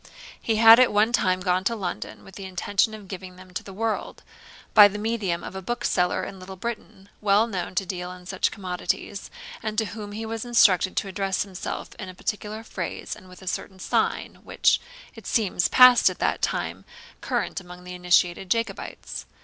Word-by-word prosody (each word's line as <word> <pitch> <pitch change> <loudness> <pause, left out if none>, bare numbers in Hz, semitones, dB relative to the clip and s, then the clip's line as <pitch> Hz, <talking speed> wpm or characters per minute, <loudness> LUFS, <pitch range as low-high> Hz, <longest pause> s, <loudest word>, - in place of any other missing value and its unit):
He 225 - 0
had 225 +1 +9
at 255 - +5
one 210 +2 +3
time 185 -4 +2
gone 180 0 +1
to 230 - +1
London, 190 -5 -5
with 195 - -14
the 195 - -8
intention 195 +3 0
of 210 -2 -12
giving 185 -1 -8
them 185 0 -14
to - - -3
the 195 - -11
world, 220 +3 -3 0.5
by 205 -1 +10
the 205 +1 -5
medium 210 -5 -1
of - - -7
a 190 - -5
bookseller 190 -4 0
in 195 - -7
Little 185 +1 -9
Britain, 200 -2 -6
well 210 +1 +4
known 190 -5 -4
to 195 - +1
deal 180 -1 -5
in 180 0 -11
such 185 +1 0
commodities, 185 0 -4 0.3
and 215 -1 -4
to 220 - +2
whom 210 -2 -7
he 220 +2 -5
was 225 0 -4
instructed 210 -6 +4
to - - 0
address 195 0 -1
himself 190 -2 -6
in 190 - -6
a 185 - -10
particular 210 +3 -4
phrase 185 -6 -5
and 185 - -15
with 180 +1 -14
a - - -13
certain 190 +1 -4
sign, 185 - -1
which, - - +2 0.3
it - - -12
seems, 200 -6 +1
passed 250 -1 +8
at - - -7
that - - 0
time - - -2 0.4
current - - -2
among 180 0 -12
the 180 0 -8
initiated 180 0 +2
Jacobites. 225 -2 -3
195 Hz, 195 wpm, -25 LUFS, 185-220 Hz, 0.5 s, by